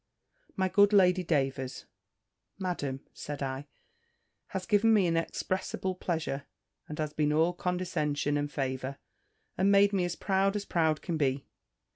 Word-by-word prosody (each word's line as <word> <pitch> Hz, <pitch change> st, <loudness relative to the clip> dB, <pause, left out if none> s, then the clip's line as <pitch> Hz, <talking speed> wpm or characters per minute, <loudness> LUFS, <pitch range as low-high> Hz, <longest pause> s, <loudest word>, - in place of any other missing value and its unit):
"My 190 Hz, 0 st, +1 dB
good 205 Hz, +2 st, +4 dB
Lady 185 Hz, -2 st, +5 dB
Davers, 135 Hz, -5 st, -1 dB, 0.7 s
Madam," 145 Hz, -8 st, -3 dB
said 145 Hz, -1 st, -5 dB
I, 135 Hz, +1 st, -4 dB, 0.8 s
"has 190 Hz, -1 st, -4 dB
given 225 Hz, 0 st, +4 dB
me 200 Hz, -3 st, +4 dB
inexpressible 185 Hz, +3 st, -1 dB
pleasure, 160 Hz, -6 st, -3 dB, 0.4 s
and 150 Hz, -, -7 dB
has 155 Hz, -1 st, -2 dB
been 150 Hz, -1 st, +1 dB
all 160 Hz, +3 st, +3 dB
condescension 170 Hz, -5 st, -1 dB
and 145 Hz, 0 st, -1 dB
favour, 135 Hz, 0 st, -3 dB, 0.6 s
and 195 Hz, +2 st, +4 dB
made 200 Hz, 0 st, +5 dB
me 190 Hz, -2 st, +2 dB
as 175 Hz, -1 st, -2 dB
proud 195 Hz, +1 st, +1 dB
as 205 Hz, -1 st, -2 dB
proud 160 Hz, -3 st, +1 dB
can 170 Hz, -3 st, -2 dB
be." 135 Hz, -2 st, 0 dB
165 Hz, 140 wpm, -30 LUFS, 145-190 Hz, 0.8 s, Lady